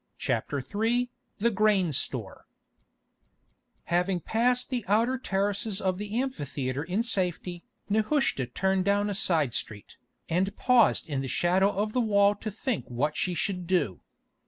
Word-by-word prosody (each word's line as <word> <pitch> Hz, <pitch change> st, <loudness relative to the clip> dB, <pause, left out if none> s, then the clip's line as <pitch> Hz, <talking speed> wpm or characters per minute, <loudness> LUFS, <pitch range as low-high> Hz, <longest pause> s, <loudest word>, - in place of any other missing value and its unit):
CHAPTER 145 Hz, -, -1 dB
III 235 Hz, -, 0 dB, 0.3 s
THE 235 Hz, +3 st, +2 dB
GRAIN 205 Hz, -4 st, +3 dB
STORE -, -, -4 dB, 1.4 s
Having 180 Hz, +1 st, 0 dB
passed 245 Hz, -, +1 dB
the 245 Hz, -3 st, -1 dB
outer 230 Hz, +6 st, +2 dB
terraces 200 Hz, -1 st, -1 dB
of 185 Hz, -2 st, -1 dB
the 210 Hz, +3 st, -2 dB
amphitheatre 140 Hz, -, -3 dB
in 185 Hz, +7 st, -1 dB
safety, 180 Hz, -5 st, -2 dB, 0.2 s
Nehushta 215 Hz, -, +1 dB
turned 190 Hz, +4 st, 0 dB
down 205 Hz, +1 st, +1 dB
a -, -, -1 dB
side 160 Hz, -, +1 dB
street, 105 Hz, -3 st, -6 dB, 0.3 s
and 185 Hz, +4 st, 0 dB
paused 250 Hz, -3 st, +4 dB
in 140 Hz, -4 st, -2 dB
the 135 Hz, -, -4 dB
shadow 185 Hz, +7 st, +2 dB
of 210 Hz, +2 st, -2 dB
the 250 Hz, -, +2 dB
wall 200 Hz, -2 st, +4 dB
to 210 Hz, +1 st, -6 dB
think 220 Hz, +3 st, -3 dB
what 140 Hz, +5 st, -1 dB
she 180 Hz, -1 st, -1 dB
should 180 Hz, +1 st, -2 dB
do. 160 Hz, -, 0 dB
195 Hz, 145 wpm, -28 LUFS, 175-220 Hz, 1.4 s, paused